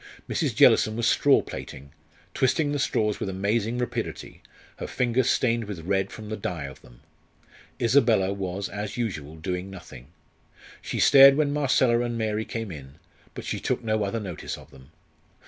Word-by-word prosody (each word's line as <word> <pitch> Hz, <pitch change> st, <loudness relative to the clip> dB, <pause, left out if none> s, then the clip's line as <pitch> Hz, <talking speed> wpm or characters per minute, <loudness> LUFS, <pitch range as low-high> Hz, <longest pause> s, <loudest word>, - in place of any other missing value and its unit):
Mrs. -, -, -1 dB
Jellison 110 Hz, -, +5 dB
was 120 Hz, 0 st, 0 dB
straw 145 Hz, -1 st, +4 dB
plaiting, 70 Hz, +2 st, -9 dB, 0.4 s
twisting 145 Hz, +3 st, +1 dB
the 145 Hz, -, -1 dB
straws 105 Hz, -5 st, 0 dB
with -, -, -3 dB
amazing 105 Hz, +5 st, -1 dB
rapidity, 120 Hz, -2 st, -4 dB, 0.4 s
her -, -, -5 dB
fingers 125 Hz, 0 st, +1 dB
stained 115 Hz, -2 st, +1 dB
with 100 Hz, -5 st, -7 dB
red 95 Hz, +1 st, 0 dB
from 110 Hz, -1 st, -9 dB
the 110 Hz, -, -3 dB
dye 90 Hz, -7 st, -4 dB
of 70 Hz, -1 st, -9 dB
them. -, -, -18 dB, 0.8 s
Isabella 115 Hz, -6 st, +3 dB
was, 95 Hz, 0 st, -4 dB
as 105 Hz, +2 st, -6 dB
usual, 80 Hz, -11 st, -4 dB
doing 90 Hz, +3 st, -4 dB
nothing. 65 Hz, -9 st, -11 dB, 0.7 s
She -, -, -4 dB
stared 135 Hz, 0 st, +8 dB
when 145 Hz, -2 st, +1 dB
Marcella 130 Hz, -4 st, +2 dB
and 120 Hz, -1 st, -2 dB
Mary 110 Hz, -1 st, -1 dB
came 115 Hz, -4 st, -5 dB
in, 70 Hz, -3 st, -10 dB, 0.4 s
but -, -, -7 dB
she -, -, -3 dB
took -, -, -2 dB
no 110 Hz, -1 st, 0 dB
other 100 Hz, +3 st, -2 dB
notice 95 Hz, -7 st, -6 dB
of -, -, -15 dB
them. 65 Hz, 0 st, -16 dB
110 Hz, 165 wpm, -25 LUFS, 95-120 Hz, 0.8 s, stared